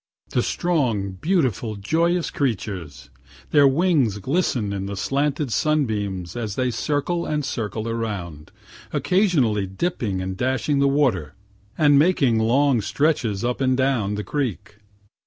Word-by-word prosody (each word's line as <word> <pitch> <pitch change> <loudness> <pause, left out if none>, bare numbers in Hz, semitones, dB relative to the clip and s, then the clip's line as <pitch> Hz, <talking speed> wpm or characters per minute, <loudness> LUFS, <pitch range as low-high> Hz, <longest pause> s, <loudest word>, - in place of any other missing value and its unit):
The - - +2
strong, 125 - 0
beautiful, 120 - 0
joyous 165 - 0
creatures! 95 - -3 0.4
Their 145 -2 +6
wings 140 - +2
glisten 120 - -1
in 100 0 -3
the 100 0 -5
slanted 140 +3 -1
sunbeams 105 - -1
as 110 -5 -4
they 125 -1 0
circle 155 +7 -1
and 150 -2 -1
circle 110 -4 -3
around, 100 -10 -4 0.4
occasionally 140 - +2
dipping 100 - -2
and 95 0 -4
dashing 130 +5 0
the 140 - +4
water, 120 - +1 0.4
and 145 -3 +5
making 140 -8 +3
long 125 +2 +3
stretches 120 -4 0
up 125 +2 -2
and 130 -1 +2
down 125 -7 +1
the 105 - -3
creek. 110 -8 -3
120 Hz, 130 wpm, -23 LUFS, 100-145 Hz, 0.4 s, Their